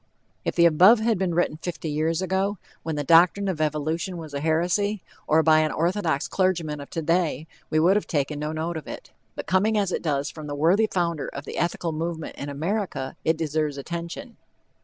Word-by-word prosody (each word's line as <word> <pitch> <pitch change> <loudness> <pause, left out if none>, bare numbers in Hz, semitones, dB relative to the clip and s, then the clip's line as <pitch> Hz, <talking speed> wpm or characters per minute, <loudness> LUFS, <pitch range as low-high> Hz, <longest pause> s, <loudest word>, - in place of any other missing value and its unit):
If - - -2
the 170 - +5
above 180 +8 +7
had 220 -3 +1
been 180 -3 0
written 170 -3 +1
fifty 165 -1 -5
years 155 +3 0
ago, 190 +2 0 0.2
when 160 -1 -3
the 145 - -2
doctrine 175 +6 +5
of 175 -5 -2
evolution 155 +4 -1
was 160 -3 -8
a 140 - -2
heresy, 175 +6 0 0.2
or 160 +1 +4
by 155 0 +5
an 155 -1 +1
orthodox 170 -4 0
clergyman 170 -6 0
of 140 - -10
today, 165 -2 0 0.2
we 155 - 0
would 180 +5 +4
have 210 - -3
taken 145 -1 -1
no 150 +1 -2
note 160 +2 -3
of 155 - -8
it. - - -9 0.2
But - - -5
coming 210 +4 +2
as 200 -3 +1
it - - -1
does 145 -3 -1
from 155 -2 -9
the 145 - -4
worthy 180 +9 +3
founder 170 -4 -1
of 140 +1 -7
the - - -7
Ethical 170 0 -1
Movement 160 0 -4
in 145 - -6
America, 155 -2 -3
it 160 0 +2
deserves 155 -2 -1
attention. 170 - -6
165 Hz, 200 wpm, -25 LUFS, 155-185 Hz, 0.2 s, above